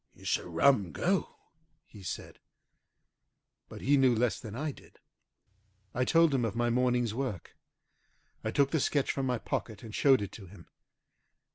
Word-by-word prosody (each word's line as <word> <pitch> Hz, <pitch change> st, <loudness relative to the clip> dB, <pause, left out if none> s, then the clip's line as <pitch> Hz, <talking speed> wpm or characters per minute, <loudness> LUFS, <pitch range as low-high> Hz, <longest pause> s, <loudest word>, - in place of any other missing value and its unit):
"It's -, -, -1 dB
a -, -, -10 dB
rum 100 Hz, +2 st, +3 dB
go!" 190 Hz, +1 st, 0 dB, 0.5 s
he 105 Hz, -, -14 dB
said. 95 Hz, -, -7 dB, 1.3 s
But -, -, -9 dB
he 140 Hz, +2 st, +3 dB
knew 130 Hz, -3 st, +4 dB
less 120 Hz, +1 st, +1 dB
than 110 Hz, -5 st, -8 dB
I 150 Hz, +4 st, -2 dB
did. -, -, -17 dB, 1.0 s
I 125 Hz, +1 st, 0 dB
told 165 Hz, +1 st, +4 dB
him 130 Hz, -3 st, +1 dB
of 110 Hz, -3 st, -2 dB
my 120 Hz, 0 st, +1 dB
morning's 125 Hz, -2 st, +1 dB
work. 125 Hz, -, -4 dB, 0.9 s
I -, -, -1 dB
took 140 Hz, -1 st, +2 dB
the 160 Hz, -, +2 dB
sketch 140 Hz, 0 st, +1 dB
from 135 Hz, -1 st, -2 dB
my 125 Hz, -1 st, +1 dB
pocket 110 Hz, -1 st, -4 dB
and 110 Hz, -2 st, -9 dB
showed 135 Hz, -3 st, +4 dB
it 100 Hz, -, -6 dB
to 100 Hz, -4 st, -11 dB
him. 85 Hz, -2 st, -14 dB
125 Hz, 165 wpm, -30 LUFS, 110-135 Hz, 1.3 s, knew